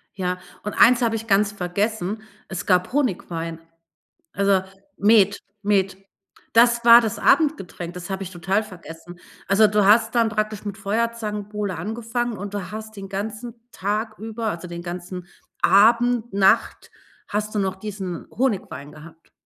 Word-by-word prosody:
Ja, 180 -1 -2 0.2
und 210 - -4
eins 245 +1 +5
habe 230 -2 +1
ich 225 0 -5
ganz 200 0 +3
vergessen, 205 +2 -2 0.3
es 190 - -5
gab 180 -1 +2
Honigwein. 170 - -2 0.7
Also 200 -1 +2 0.4
Met 205 -1 +4 0.2
Met. 195 -2 +1 0.6
Das 235 0 +4
war 235 0 +10
das 220 -3 -3
Abendgetränk, 195 - +1
das 180 +2 -8
habe 190 0 -3
ich 190 - -8
total 190 +4 0
vergessen. 175 -3 -12 0.3
Also, 210 +2 +5
du 210 -1 +2
hast 225 +3 +4
dann 230 -1 +3
praktisch 215 -1 -2
mit 205 -1 -5
Feuerzangenbowle 210 -2 -3
angefangen 230 +1 -3
und 200 +2 -7
du 195 -2 -5
hast 220 0 -8
den 195 -1 -8
ganzen 215 +4 -5 0.2
Tag 215 +3 -2
über, 225 +1 -5
also 180 -3 -4
den 170 0 -6
ganzen 180 +1 -7 0.3
Abend 235 +3 +4
Nacht 195 -1 +2 0.4
hast 210 +1 -3
du - - +1
noch 190 -1 -1
diesen 190 -3 -6
Honigwein 195 - -2
gehabt. 165 +1 -15
205 Hz, 150 wpm, -23 LUFS, 185-220 Hz, 0.7 s, war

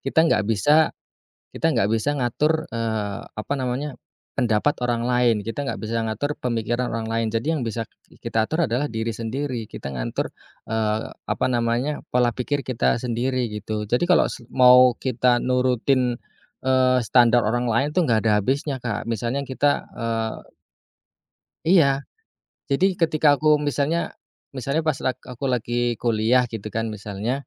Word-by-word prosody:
kita 135 - -2
enggak 165 - +3
bisa 145 +9 +3 0.6
kita - - +1
enggak 100 - +2
bisa 115 +6 +1
ngatur, 150 +6 0
eee, 110 -3 -2
apa 110 +6 -4
namanya, 130 +2 -3 0.4
pendapat 120 +3 +2
orang 120 -1 -1
lain, 125 -2 +3
kita 140 +5 -3
enggak - - -4
bisa 115 +1 -2
ngatur 115 +7 -2
pemikiran 120 0 -1
orang 115 -1 -3
lain. 115 0 0
Jadi 115 +6 -1
yang 150 - -2
bisa 115 0 -3 0.4
kita 110 -1 0
atur 165 +1 +1
adalah 125 +5 0
diri 110 0 -3
sendiri 120 +2 -3
kita 70 - -7
ngatur, - - -3 0.4
eee, 110 -1 -1
apa - - -3
namanya, 120 +4 0
pola 125 -1 +4
pikir 140 +4 -2
kita 125 -3 +1
sendiri 125 0 -1
gitu. 105 0 -4
Jadi 125 +9 +2
kalau - - +5
se 120 - -9
mau 125 -1 +6
kita 125 -1 +2
nurutin, 125 0 +1 0.5
eee, 130 -1 +4
standar 120 -1 +4
orang 120 +2 0
lain 120 +6 +1
tuh 180 - +3
nggak 110 - +4
ada 110 - +4
habisnya, 135 +2 -1
Kak, 115 -4 -3
misalnya 120 +4 -2
kita, 140 +2 +2 0.2
eee 115 -1 -4 1.2
Iya, 140 -7 +4 0.7
jadi 140 +8 +3
ketika 155 -3 +3
aku 150 +1 +3
misalnya 145 +4 -1 0.4
misalnya 140 +5 -1
pas 155 - +3
lag 130 - -1
aku 125 +3 -7
lagi 120 -1 -1
kuliah 120 +2 +3
gitu 110 -1 -5
kan 115 0 -2
misalnya, 105 +1 -4
120 Hz, 155 wpm, -23 LUFS, 115-135 Hz, 1.2 s, mau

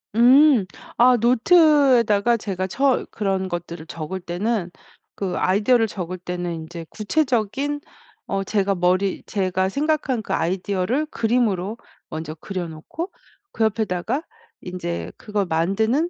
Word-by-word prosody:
음. 255 -1 +6 0.3
아 250 +1 +6
노트에다가 245 - +4
제가 190 -3 -3
처 270 +6 +1
그런 195 -3 -1
것들을 170 -2 -6
적을 165 +4 -5
때는 185 +2 -2 0.5
그 190 -3 -3
아이디어를 220 +5 +3
적을 185 -3 -5
때는 175 -1 -4
인제 165 +1 -7
구체적인 260 +3 0 0.5
어 195 0 -1
제가 200 0 0
머리 185 +2 +1
제가 190 -2 0
생각한 280 -2 0
그 - - -4
아이디어를 190 - 0
그림으로 225 - 0 0.3
먼저 155 -1 -5
그려 180 +2 -5
놓고 240 - -7 0.4
그 225 - 0
옆에다가 220 - -1 0.4
인제 175 -1 -5
그걸 210 -4 -2
만드는 210 - +1
200 Hz, 270 characters per minute, -22 LUFS, 180-245 Hz, 0.5 s, 음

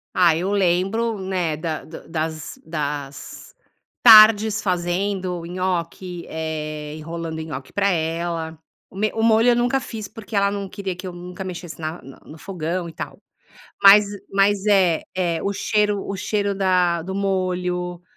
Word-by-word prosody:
Ah, 170 -3 +5
eu 180 +4 -1
lembro, 200 +4 +1
né, 185 -4 -1
da 155 0 -4
da 160 - -11
das 160 -1 -4
das 145 - -5 0.5
tardes 220 -1 +8
fazendo 180 0 -1
nhoque, 180 0 -3
eh, 155 -1 -5
enrolando 165 0 -5
nhoque 140 -5 -7
pra 200 0 +2
ela, 165 -1 -2 0.3
o - - -15
me 215 +2 0
o 225 - -1
molho 225 +1 +5
eu 240 - +3
nunca 245 +2 +2
fiz, 220 -5 -7
porque 220 0 -11
ela 200 0 +3
não 200 -1 -4
queria 190 -2 -5
que 180 - -8
eu 180 - -5
nunca 180 +2 -8
mexesse 175 -2 -7
na 160 +2 -5
na 135 +1 -13
no 155 - -12
fogão 175 -1 -4
e - - -9
tal, - - -7 0.6
mas 200 +1 +9 0.3
mas 200 +1 +2
é 190 -6 +3
é 175 -3 0
o 200 - 0
cheiro 210 0 0
o 195 - -4
cheiro 200 0 -1
da 180 -3 +2
do 190 +3 -5
molho, 180 -2 -2
180 Hz, 160 wpm, -22 LUFS, 165-200 Hz, 0.6 s, mas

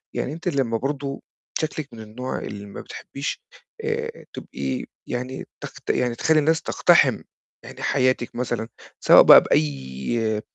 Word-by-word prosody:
يعني 135 - -2
أنتِ 165 +3 -7
لمّا 135 -8 +1
برضو 140 +2 -4 0.4
شكلِك 155 -2 -3
من 115 - -10
النوع 115 +4 -5
اللي 100 0 -7
ما 100 - -8
بتحبيش، 140 +1 -6 0.4
آآ، 460 +1 -3
تبقي 260 -1 -4 0.2
يعني 125 +2 -4 0.2
تقت - - -9
يعني 125 -1 +1
تخلّي 160 +5 +3
الناس 160 +2 +2
تقتحم - - +4 0.4
يعني - - -10
حياتِك 130 -2 +1
مثلًا، 120 -2 -2 0.3
سواء - - +8
بقى - - +10
بأي 75 - -1
130 Hz, 135 wpm, -23 LUFS, 110-150 Hz, 0.4 s, بقى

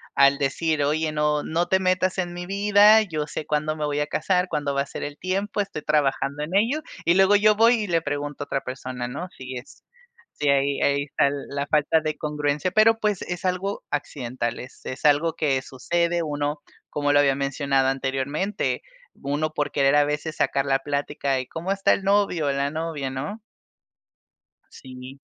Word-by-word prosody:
al 140 0 +5
decir: 150 +2 0
"Oye, 155 +2 0
no 150 0 +1
no 170 +2 -1
te 190 - +3
metas 185 0 +1
en 175 -2 -2
mi 175 0 -6
vida, 205 +3 +5
yo 155 -6 -3
sé 150 0 -6
cuándo 155 +1 -1
me 150 - -2
voy 145 0 -1
a 150 - -1
casar, 180 +5 0
cuándo 145 -1 -1
va 140 - +2
a 140 - -2
ser - - -7
el 145 0 -6
tiempo, 200 +3 -1
estoy 195 -6 -5
trabajando 145 -1 0
en 165 +5 -6
ello, 235 +10 +2 0.2
y 170 - +5
luego 195 +2 +5
yo 215 +1 +4
voy, 230 +3 +5
y - - -4
le 165 -2 +1
pregunto 145 -1 -4
a - - -11
otra 135 - -1
persona, 130 -1 -5
¿no?". 180 +9 -6
Sí 130 0 -7
es 125 +2 -10 0.5
sí, 145 -1 -1
ahí 140 0 +2
ahí 140 0 +2
está 140 -1 +1
la 140 0 -4
falta 155 +1 +2
de 155 -1 -3
congruencia, 150 +3 -1
pero 225 +2 +4
pues 210 -4 0
es 175 +2 -5
algo 185 +2 -2
accidental, 120 -4 -3
es 125 - -11
es 130 +4 -6
algo 150 +3 +3
que 135 -4 +1
sucede, 170 +7 -1
uno, 145 -1 -2 0.3
como 145 0 0
lo 145 - +5
había 140 -2 +3
mencionado 135 -1 0
anteriormente, 135 +8 -1 0.4
uno 145 +3 -1
por 145 -1 -1
querer 140 0 +3
a 145 - +5
veces, 150 +2 -3
sacar 140 0 +1
la 135 -1 +2
plática, 140 -1 -2
y, 130 - -10
¿cómo 170 +7 -4
está 195 0 +2
el 195 - -2
novio? 195 -6 +2
La 140 +1 0
novia, 155 -4 -3
¿no? 170 +12 -5 1.3
Sí. 130 +1 -11
150 Hz, 190 wpm, -24 LUFS, 140-180 Hz, 1.3 s, al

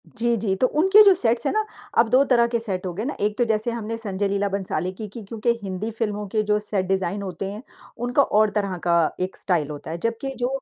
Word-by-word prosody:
जी, 235 0 0
जी। 200 -2 0
तो 255 - +5
उनके 380 +10 +5
जो 400 -2 +7
सेट्स 235 -8 +1
हैं - - +2
ना, 435 0 +1 0.3
अब 230 - +5
2 255 +4 +5
तरह 240 -3 +4
के 235 0 -1
सेट 195 -5 -3
हो 180 - -3
गए 205 +5 -4
ना। 290 - -3
एक 210 +1 0
तो 240 - +2
जैसे 220 +1 0
हमने 230 -1 -4
संजय 205 -3 -2
लीला 200 +1 0
भंसाली 185 -3 -2
की 210 +3 -7
की 215 +3 -9
क्योंकि 220 +3 -3
हिंदी 200 +3 -4
फ़िल्मों 210 -2 -3
के 215 +2 0
जो 210 0 +2
सेट 205 -2 -2
डिज़ाइन 190 +1 -1
होते 190 -1 -5
हैं, 210 +2 -7 0.4
उनका 245 +3 +2
और 215 -3 +3
तरह 200 -3 0
का 170 - +4 0.2
एक 185 +1 -3
स्टाइल 165 -6 0
होता 150 +1 -7
है। 165 - -3
जबकि 230 +8 -3
जो 245 - +1
210 Hz, 250 wpm, -23 LUFS, 195-235 Hz, 0.4 s, जो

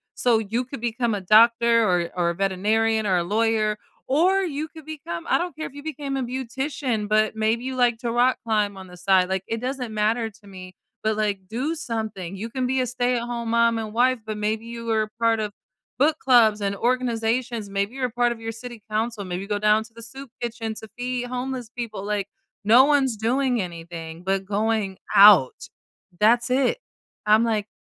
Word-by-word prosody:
So, 235 -3 +3
you 225 +3 -2
could 275 0 -8
become 235 0 -1
a - - -3
doctor 230 +3 +5
or 175 -2 +1
or 175 -1 +1
a - - -7
veterinarian 215 +4 +1
or 185 -2 +2
a 170 - +1
lawyer, 215 +1 +1 0.3
or 360 +8 +3
you 310 -2 -3
could 315 -1 -13
become 280 - -6
I - - +4
don't 350 -2 -4
care 310 - -5
if - - -15
you 285 - -9
became 285 -3 -4
a 260 - -1
beautician, 255 -2 -3
but, 215 +1 +2
maybe 220 +2 0
you 265 - -3
like 245 -2 +3
to 235 -1 -3
rock 245 +2 +3
climb 210 -3 0
on 190 - -9
the 180 - -13
side, 185 0 +3
like, 190 0 -1
it 225 0 -2
doesn't 250 -3 -4
matter 220 +2 0
to 205 -1 -20
me, 185 -1 -11 0.3
but, 215 0 0
like, 200 -3 -2
do 265 +8 -2
something! 220 - -4
You 225 +4 -5
can 255 -1 -1
be 260 0 +1
a - - 0
stay-at-home 240 -1 -2
mom 235 0 +3
and 215 -1 -5
wife, 255 +1 +3
but 215 -1 -4
maybe 215 +2 -2
you 235 0 -7
were 220 -2 0
part 230 -1 +2
of 210 -1 -2 0.5
book 305 +2 +3
clubs 225 -5 +4
and 200 0 -1
organizations, 235 -1 -1
maybe 200 +5 -2
you're 255 -2 -1
part 240 0 +1
of 225 - -14
your 225 0 -4
city 230 -1 -9
council, 220 -1 -1
maybe 185 +2 -5
go 205 0 -1
down 210 +1 +3
to 225 - -18
the 230 - -10
soup 265 +4 -9
kitchen 230 -2 -4
to 220 - -9
feed 245 0 -3
homeless 250 -1 -4
people, 225 -5 -5
like, 205 -2 -2 0.4
no 240 +5 +7
one's 275 -5 +2
doing 245 +1 +1
anything, 165 -1 -7
but 195 0 -1
going 210 -1 -1 0.2
out! 195 -10 +7 0.5
That's 240 +3 +4
it. 275 - +2 0.5
I'm 215 +2 +5
like 215 -2 -1
225 Hz, 200 wpm, -24 LUFS, 210-250 Hz, 0.5 s, no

